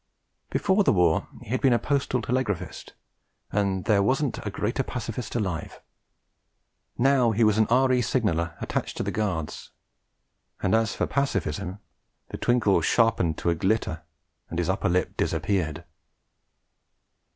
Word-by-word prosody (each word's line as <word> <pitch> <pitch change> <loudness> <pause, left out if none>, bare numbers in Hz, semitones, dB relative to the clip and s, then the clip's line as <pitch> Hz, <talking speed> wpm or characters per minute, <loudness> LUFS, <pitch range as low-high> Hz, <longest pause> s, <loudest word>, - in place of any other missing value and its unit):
Before 205 +1 +2
the - - +4
war 85 -4 +2 0.2
he - - -14
had 130 - 0
been 130 -3 +4
a - - +4
postal 135 -3 -1
telegraphist, 105 -8 -3 0.6
and 100 -3 0
'there 105 -2 +4
wasn't 130 +5 0
a 105 - -3
greater 105 +6 -1
pacifist 120 -3 -5
alive'; 95 -8 -3 1.2
now 130 -1 +4
he 115 +1 +2
was 110 0 +3
an 110 - +4
R.E. 130 +1 +4
signaller 85 - 0
attached - - -3
to - - -1
the - - -2
Guards, 90 -8 -3 0.9
and 95 - 0
as 115 -1 +2
for - - 0
pacifism 100 - -2 0.5
the - - -5
twinkle 110 -7 +2
sharpened 95 -5 +2
to 85 - 0
a - - +3
glitter 95 -2 0 0.5
and 85 - -5
his 90 0 0
upper 95 - 0
lip 90 +1 0
disappeared. 85 -5 -1
105 Hz, 140 wpm, -26 LUFS, 90-125 Hz, 1.2 s, the